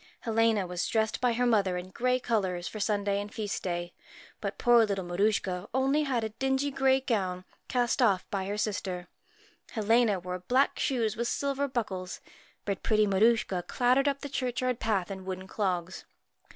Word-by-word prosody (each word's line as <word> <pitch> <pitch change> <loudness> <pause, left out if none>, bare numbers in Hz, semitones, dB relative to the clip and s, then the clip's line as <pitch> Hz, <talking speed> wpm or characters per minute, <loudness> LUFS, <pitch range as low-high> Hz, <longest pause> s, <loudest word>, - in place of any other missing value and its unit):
USCHKA - - -24
Helena 225 -3 +2
was 180 0 -2
dressed 220 0 0
by 245 -2 +3
her 245 +2 +1
mother 200 -6 +2
in 180 +1 -7
gay 250 +4 +1
colours 190 -7 -1
for 215 - -6
Sunday 205 -1 0
and 205 0 -7
Feast 210 -3 -3
day, 175 -1 -3 0.5
but - - -4
poor 240 -1 +5
little 195 -3 -1
Mar 175 0 -5
suchka 200 -3 +1
had 190 - -11
only 270 +3 +2
a 235 -5 0
dingy 270 +1 +1
grey 265 0 +3
gown, 185 -7 -1 0.2
cast 245 +1 +1
off 195 -6 +3
by 195 -2 -1
her 205 +1 -2
sister. 185 -4 -3 0.6
Helena 220 -2 +3
wore 180 +1 -5
black 255 +9 +1
shoes 230 -6 0
with 235 +1 -1
silver 280 +1 -1
buckles, 190 -8 -3 0.5
but 200 -2 -2
pretty 215 -1 +3
Maruschka 200 -2 +2
clattered 255 +3 +2
up 280 -1 0
the 285 - -4
churchyard 255 -2 -1
path 200 -5 0
in 190 -1 -6
wooden 185 0 -5
clogs. 185 -3 -2
215 Hz, 180 wpm, -29 LUFS, 190-245 Hz, 0.6 s, poor